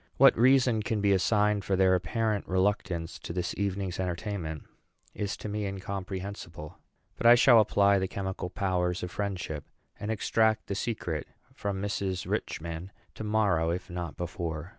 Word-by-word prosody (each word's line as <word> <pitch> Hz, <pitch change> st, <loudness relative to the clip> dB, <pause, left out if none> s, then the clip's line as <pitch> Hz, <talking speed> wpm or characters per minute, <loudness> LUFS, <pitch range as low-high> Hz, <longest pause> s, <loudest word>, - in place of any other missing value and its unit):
What -, -, +7 dB
reason 125 Hz, -2 st, +4 dB
can 105 Hz, +1 st, -1 dB
be 100 Hz, 0 st, +3 dB
assigned 105 Hz, +2 st, +2 dB
for 95 Hz, -, 0 dB
their 95 Hz, 0 st, +4 dB
apparent 105 Hz, +4 st, 0 dB
reluctance 95 Hz, -4 st, 0 dB
to -, -, -7 dB
this 90 Hz, 0 st, -2 dB
evening's 95 Hz, -2 st, -2 dB
entertainment 90 Hz, -3 st, -3 dB, 0.5 s
is 100 Hz, -1 st, -3 dB
to -, -, -6 dB
me 105 Hz, 0 st, -2 dB
incomprehensible; 95 Hz, -4 st, -6 dB, 0.4 s
but 115 Hz, -, +2 dB
I 120 Hz, -, +10 dB
shall 120 Hz, -1 st, +7 dB
apply 100 Hz, -2 st, +4 dB
the 95 Hz, -, -1 dB
chemical 95 Hz, -2 st, -4 dB
powers 90 Hz, -2 st, -1 dB
of 90 Hz, -, -4 dB
friendship, 90 Hz, -7 st, -3 dB, 0.4 s
and 105 Hz, -, -4 dB
extract 110 Hz, 0 st, +2 dB
the -, -, -3 dB
secret 95 Hz, -7 st, -3 dB, 0.3 s
from 100 Hz, -1 st, -3 dB
Mrs. 95 Hz, -2 st, -2 dB
Richman 85 Hz, +3 st, -3 dB, 0.2 s
to -, -, -7 dB
morrow, 105 Hz, -7 st, +2 dB
if 90 Hz, +1 st, -3 dB
not 85 Hz, -3 st, -5 dB
before. 85 Hz, -1 st, -4 dB
95 Hz, 155 wpm, -29 LUFS, 90-105 Hz, 0.5 s, I